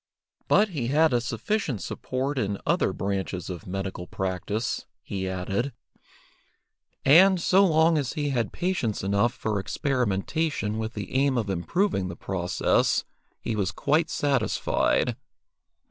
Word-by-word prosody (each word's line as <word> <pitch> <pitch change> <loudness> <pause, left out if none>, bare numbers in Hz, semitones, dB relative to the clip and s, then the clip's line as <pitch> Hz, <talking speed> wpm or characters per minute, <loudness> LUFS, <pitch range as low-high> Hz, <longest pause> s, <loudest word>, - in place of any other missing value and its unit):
But 210 +1 +4
he 140 -10 -3
had 155 +2 +3
a 120 - +3
sufficient 125 - -2
support 135 +2 -3
in 100 -3 -1
other - - +2
branches 95 -2 -3
of 90 0 -8
medical 95 -1 -4
practice, 95 +4 -3 0.2
he 95 -1 -3
added, 95 +8 -2 1.3
and, 185 +6 +7
so 190 +3 +4
long 160 -1 +4
as 135 -3 -2
he 150 -2 -1
had 120 -7 -1
patients 175 - -1
enough 100 +4 +2
for 110 -5 -2
experimentation 120 +1 -1
with 110 +1 -3
the 105 -3 -6
aim 135 0 +2
of 105 -4 -1
improving 95 - 0
the 85 - -6
process, 90 -1 +1 0.3
he 110 - -3
was 100 -4 0
quite 150 +11 +1
satisfied. 135 -6 +1
115 Hz, 130 wpm, -26 LUFS, 95-145 Hz, 1.3 s, and